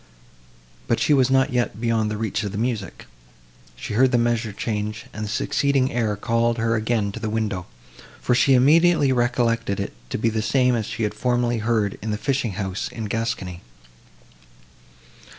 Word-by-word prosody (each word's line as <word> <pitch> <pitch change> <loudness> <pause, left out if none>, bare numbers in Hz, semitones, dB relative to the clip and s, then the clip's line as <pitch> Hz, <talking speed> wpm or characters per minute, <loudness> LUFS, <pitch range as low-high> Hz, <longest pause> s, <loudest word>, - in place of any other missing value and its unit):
But - - +1
she - - +3
was 130 -2 +4
not 135 0 +2
yet 120 -4 -1
beyond 115 -2 +1
the 105 - -3
reach 110 0 -2
of 105 -2 -3
the 100 - -5
music; 110 -5 -3 0.7
she 80 - -6
heard 130 +4 +4
the 125 - +3
measure 120 -1 0
change, 105 0 -4
and 105 0 -4
the - - -5
succeeding 135 +4 +1
air 110 -3 0
called 115 +3 0
her 115 0 +1
again 110 -2 0
to 115 - -7
the 110 -1 -3
window, 105 -5 -2 0.5
for - - +1
she 130 +2 +4
immediately 150 +2 +4
recollected 120 -4 0
it 100 - -4 0.2
to - - -2
be 115 +1 +1
the 110 0 -1
same 125 +2 +2
she 115 +2 -4
had 105 - -1
formerly 120 -2 0
heard 110 -2 0
in 110 - -4
the 105 - -1
fishing 120 0 -1
house 95 0 -3
in 115 -2 -6
Gascony. 100 -5 -3
115 Hz, 175 wpm, -23 LUFS, 105-125 Hz, 0.7 s, was